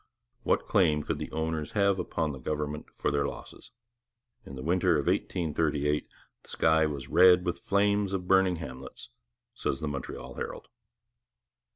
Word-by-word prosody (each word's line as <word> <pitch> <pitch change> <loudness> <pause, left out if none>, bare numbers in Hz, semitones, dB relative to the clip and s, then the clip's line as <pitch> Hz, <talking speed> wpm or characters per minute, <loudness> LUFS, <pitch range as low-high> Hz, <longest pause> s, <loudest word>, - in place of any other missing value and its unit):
What - - +1
claim 75 -5 +3
could 75 0 -3
the 75 - -5
owners 80 -1 -3
have 100 -2 +2
upon 80 -3 -1
the 70 - -8
government 75 +2 -3
for - - 0
their 70 -1 +1
losses? 70 - -10 0.8
In 70 - -8
the 65 - -7
winter 90 +4 +2
of - - -1
1838 75 -3 0 0.3
the - - -20
sky 80 -1 +3
was 70 -3 -5
red 90 0 +6
with 90 - -1
the - - -30
flames 100 0 +2
of 90 -2 -3
burning 95 -1 +4
hamlets, 65 -5 -9 0.4
says 65 - -2
the 75 - -3
Montreal 65 -2 -6
Herald. - - -6
80 Hz, 160 wpm, -29 LUFS, 75-90 Hz, 0.8 s, red